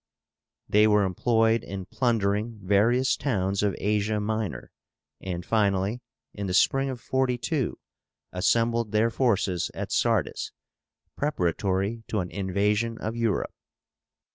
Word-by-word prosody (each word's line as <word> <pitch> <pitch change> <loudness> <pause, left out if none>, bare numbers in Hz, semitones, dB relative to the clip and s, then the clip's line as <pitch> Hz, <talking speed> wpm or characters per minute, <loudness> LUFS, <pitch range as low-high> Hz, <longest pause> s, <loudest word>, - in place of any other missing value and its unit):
They 105 +1 +5
were 105 -1 +4
employed 115 +4 +2
in 95 -1 -6
plundering 110 -1 0
various 115 +7 +3
towns 100 -7 -1
of 105 -2 +1
Asia 105 +1 0
Minor, 110 -3 -3 0.5
and 90 -2 -5
finally, 105 +1 +1 0.3
in 100 -1 -4
the 90 - -1
spring 135 +6 +3
of 130 -2 -5
42, 130 +3 -1 0.5
assembled 115 +4 +1
their 110 +2 +3
forces 100 -8 +1
at - - -5
Sardis - - 0 0.6
preparatory 100 - -1
to 110 - -1
an 90 -2 -4
invasion 105 +4 0
of 110 +2 -4
Europe. 115 -5 -1
105 Hz, 115 wpm, -26 LUFS, 100-115 Hz, 0.6 s, They